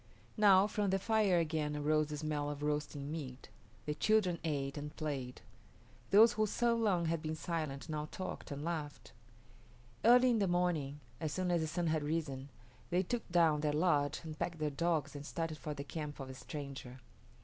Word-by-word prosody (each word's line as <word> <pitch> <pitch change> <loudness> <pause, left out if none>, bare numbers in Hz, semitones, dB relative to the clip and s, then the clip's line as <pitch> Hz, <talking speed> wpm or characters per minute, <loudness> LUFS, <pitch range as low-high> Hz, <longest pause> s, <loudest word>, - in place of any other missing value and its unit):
Now 200 -3 +6
from 210 -1 0
the 190 - +2
fire 205 -2 +2
again 155 -3 0
arose 155 +1 +2
the 150 0 -5
smell 145 -1 -2
of 145 0 -5
roasting 150 -1 -2
meat. 135 -5 -6 0.4
The 150 - -1
children 185 +1 +2
ate 140 -4 -1
and 150 0 -6
played. 140 -5 -4 0.7
Those 225 +4 +7
who 215 0 +1
so 235 +3 +2
long 200 -7 +2
had 165 -1 0
been 155 0 -3
silent 155 -3 -3
now 150 -1 -3
talked 185 -1 -6
and 145 +1 -5
laughed. 155 -4 -4 0.9
Early 250 +2 +7
in 230 - +2
the 200 - +2
morning, 165 -5 0 0.2
as 155 -2 -2
soon 185 0 0
as 170 -2 +2
the 160 - -1
sun 170 +2 -1
had 160 -1 +1
risen, 145 -3 -2 0.4
they 180 +2 +2
took 235 +4 -3
down 165 -4 +4
their 150 -1 +1
lodge 150 -3 +2
and 155 -1 -7
packed 170 -1 -2
their 155 -1 -1
dogs 155 -1 0
and 145 - -6
started 165 0 -4
for 150 -3 -4
the 140 - -5
camp 150 0 -6
of 135 -1 -6
the - - -6
stranger. 135 -2 -7
155 Hz, 190 wpm, -35 LUFS, 145-175 Hz, 0.9 s, Those